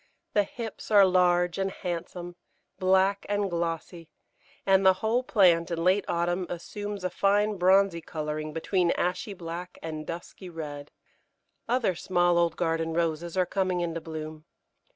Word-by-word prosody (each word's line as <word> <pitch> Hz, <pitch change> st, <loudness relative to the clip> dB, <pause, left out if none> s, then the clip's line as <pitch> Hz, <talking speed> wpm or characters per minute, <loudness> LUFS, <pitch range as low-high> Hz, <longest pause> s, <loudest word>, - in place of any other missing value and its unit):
The 205 Hz, -, +5 dB
hips 230 Hz, 0 st, -7 dB
are 205 Hz, -2 st, +7 dB
large 180 Hz, -1 st, +3 dB
and 195 Hz, 0 st, 0 dB
handsome, 175 Hz, -1 st, -5 dB, 0.4 s
black 190 Hz, +1 st, +3 dB
and 205 Hz, -2 st, 0 dB
glossy, 170 Hz, 0 st, -3 dB, 0.6 s
and 195 Hz, 0 st, +4 dB
the 190 Hz, 0 st, +7 dB
whole 220 Hz, +5 st, +1 dB
plant 180 Hz, -9 st, +3 dB
in 165 Hz, -1 st, -2 dB
late 190 Hz, +3 st, +3 dB
autumn 175 Hz, +1 st, -1 dB
assumes 205 Hz, +3 st, -6 dB
a 185 Hz, -, 0 dB
fine 205 Hz, +2 st, +2 dB
bronzy 185 Hz, -1 st, +4 dB
colouring 155 Hz, -1 st, -4 dB
between 170 Hz, +3 st, 0 dB
ashy 185 Hz, +3 st, -2 dB
black 175 Hz, +1 st, -7 dB
and 155 Hz, -1 st, -5 dB
dusky 175 Hz, +2 st, -7 dB
red. 150 Hz, -3 st, -7 dB, 0.8 s
Other 240 Hz, -6 st, +2 dB
small 175 Hz, 0 st, +2 dB
old 170 Hz, -1 st, +1 dB
garden 165 Hz, -1 st, -1 dB
Roses 170 Hz, +1 st, -1 dB
are 185 Hz, -, +3 dB
coming 185 Hz, -1 st, -1 dB
into 165 Hz, -1 st, -3 dB
bloom. 155 Hz, -1 st, -7 dB
175 Hz, 145 wpm, -27 LUFS, 165-195 Hz, 0.8 s, are